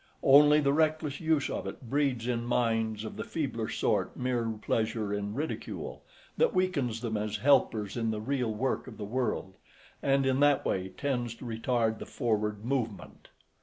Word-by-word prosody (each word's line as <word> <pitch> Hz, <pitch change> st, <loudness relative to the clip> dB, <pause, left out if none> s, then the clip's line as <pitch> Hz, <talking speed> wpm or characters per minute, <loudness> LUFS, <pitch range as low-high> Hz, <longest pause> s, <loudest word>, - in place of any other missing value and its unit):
Only 150 Hz, +2 st, +7 dB
the 140 Hz, -2 st, +2 dB
reckless 155 Hz, -2 st, +1 dB
use 160 Hz, -3 st, +2 dB
of -, -, -4 dB
it -, -, -7 dB
breeds 135 Hz, -3 st, 0 dB
in 120 Hz, -1 st, 0 dB
minds 115 Hz, -3 st, 0 dB
of 110 Hz, -, -7 dB
the -, -, -3 dB
feebler -, -, -3 dB
sort -, -, 0 dB
mere 125 Hz, -2 st, 0 dB
pleasure 110 Hz, -1 st, -1 dB
in 100 Hz, +1 st, -3 dB
ridicule, 150 Hz, +4 st, -4 dB, 0.4 s
that 485 Hz, -, +3 dB
weakens 140 Hz, -12 st, 0 dB
them 115 Hz, -3 st, -2 dB
as 105 Hz, 0 st, -2 dB
helpers 110 Hz, -4 st, +2 dB
in 115 Hz, -2 st, 0 dB
the 110 Hz, -1 st, -2 dB
real 125 Hz, 0 st, -1 dB
work 125 Hz, +6 st, -1 dB
of 115 Hz, -, -10 dB
the 105 Hz, -, -5 dB
world, 115 Hz, -4 st, -2 dB, 0.5 s
and 135 Hz, -1 st, +2 dB
in 130 Hz, 0 st, +2 dB
that 145 Hz, -1 st, +4 dB
way 95 Hz, 0 st, -1 dB
tends 120 Hz, +1 st, -2 dB
to 125 Hz, -, -11 dB
retard 115 Hz, -1 st, 0 dB
the -, -, -7 dB
forward 105 Hz, -3 st, -1 dB
movement. 120 Hz, -5 st, -3 dB
120 Hz, 170 wpm, -30 LUFS, 110-140 Hz, 0.5 s, Only